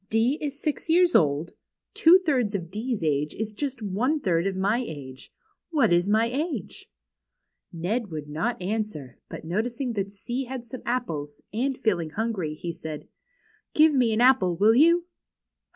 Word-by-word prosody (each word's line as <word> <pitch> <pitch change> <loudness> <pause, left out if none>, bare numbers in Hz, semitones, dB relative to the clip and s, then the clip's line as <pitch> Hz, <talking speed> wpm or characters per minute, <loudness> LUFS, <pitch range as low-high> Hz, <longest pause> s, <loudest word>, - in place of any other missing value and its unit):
D 230 +7 +2
is 285 -1 -4
six 305 +1 -3
years 350 +2 +4
old. 150 +1 +2 0.4
Two 335 +3 +7
thirds 250 -9 +1
of 175 -4 -4
D's 220 -1 -3
age 150 -1 0
is 220 0 -4
just 265 -1 -4
one 235 +10 0
third 175 -6 +1
of 195 - -2
my 200 +5 +1
age. 140 - -8 0.4
What 275 - +3
is 175 +3 +2
my 220 +2 +4
age? 270 - -4 0.4
" - - -55
Ned 200 +7 -2
would 155 -3 -6
not 165 +12 -2
answer, 185 - -4
but - - -8
noticing 235 - -2
that 200 -2 -3
C 240 +6 -4
had 250 -1 -6
some 255 +2 -8
apples, 155 -13 -3
and 260 +4 -1
feeling 175 -8 0
hungry, 190 -5 -2
he 170 +2 -5
said: 155 -2 -8 0.3
" - - -37
Give 310 0 +6
me 250 -4 +3
an 220 +2 +1
apple, 220 -9 +4
Avill 215 +4 +5
you 335 +5 +5
220 Hz, 170 wpm, -26 LUFS, 170-255 Hz, 0.4 s, Two